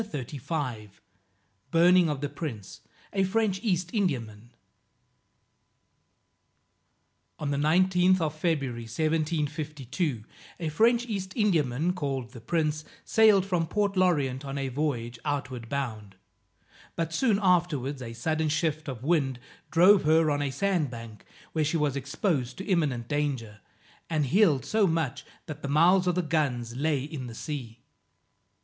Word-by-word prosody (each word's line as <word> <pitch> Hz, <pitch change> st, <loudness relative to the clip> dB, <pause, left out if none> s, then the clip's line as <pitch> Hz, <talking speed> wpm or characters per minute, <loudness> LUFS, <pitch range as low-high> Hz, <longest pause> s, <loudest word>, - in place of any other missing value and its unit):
BURNING 135 Hz, -, -4 dB, 1.2 s
OF 145 Hz, -2 st, -3 dB
THE 145 Hz, -, -2 dB
PRINCE, 115 Hz, -, -7 dB, 0.3 s
A 195 Hz, -1 st, +2 dB
FRENCH 195 Hz, 0 st, +1 dB
EAST 180 Hz, -5 st, -1 dB
INDIAMAN. 120 Hz, -, -2 dB, 2.9 s
On 145 Hz, -1 st, -3 dB
the 140 Hz, -, 0 dB
19th 180 Hz, +4 st, +3 dB
of 155 Hz, -3 st, -1 dB
February 140 Hz, -8 st, -2 dB
1752, 150 Hz, -2 st, -2 dB, 0.4 s
a 165 Hz, -3 st, -2 dB
French 230 Hz, +9 st, +3 dB
East 195 Hz, -5 st, -4 dB
Indiaman, 165 Hz, -, +1 dB
called 135 Hz, -8 st, -3 dB
the 120 Hz, -3 st, -11 dB
Prince, 155 Hz, +2 st, -1 dB, 0.2 s
sailed 215 Hz, -4 st, +5 dB
from 175 Hz, -4 st, 0 dB
Port 200 Hz, +2 st, 0 dB
L'Orient 145 Hz, -8 st, +1 dB
on 140 Hz, 0 st, -5 dB
a 135 Hz, -1 st, -2 dB
voyage 125 Hz, -4 st, -2 dB
outward 135 Hz, -5 st, -3 dB
bound. 110 Hz, -8 st, -4 dB, 0.8 s
But 165 Hz, -1 st, -2 dB
soon 215 Hz, +1 st, +2 dB
afterwards, 165 Hz, -, +1 dB
a 115 Hz, -2 st, -6 dB
sudden 155 Hz, +6 st, -1 dB
shift 155 Hz, 0 st, -1 dB
of 130 Hz, -3 st, -6 dB
wind 140 Hz, -5 st, +1 dB, 0.3 s
drove 185 Hz, +4 st, +6 dB
her 160 Hz, 0 st, +4 dB
on 145 Hz, 0 st, 0 dB
a 145 Hz, -, 0 dB
sand 165 Hz, +1 st, 0 dB
bank, 115 Hz, -3 st, -10 dB, 0.3 s
where 160 Hz, -, +1 dB
she 150 Hz, +3 st, 0 dB
was 150 Hz, -3 st, 0 dB
exposed 135 Hz, -, -2 dB
to 190 Hz, -, -6 dB
imminent 145 Hz, -, 0 dB
danger, 130 Hz, -8 st, -2 dB, 0.5 s
and 155 Hz, -3 st, +1 dB
heeled 160 Hz, -2 st, +3 dB
so 215 Hz, -2 st, +2 dB
much 150 Hz, -4 st, -2 dB, 0.2 s
that 155 Hz, -4 st, -8 dB
the -, -, -4 dB
mouths 180 Hz, +5 st, +4 dB
of 180 Hz, -, +2 dB
the 180 Hz, -, +1 dB
guns 130 Hz, -7 st, -1 dB
lay 145 Hz, 0 st, 0 dB
in 140 Hz, -3 st, -6 dB
the 115 Hz, -, -9 dB
sea. 120 Hz, -5 st, -6 dB
150 Hz, 135 wpm, -27 LUFS, 130-175 Hz, 2.9 s, drove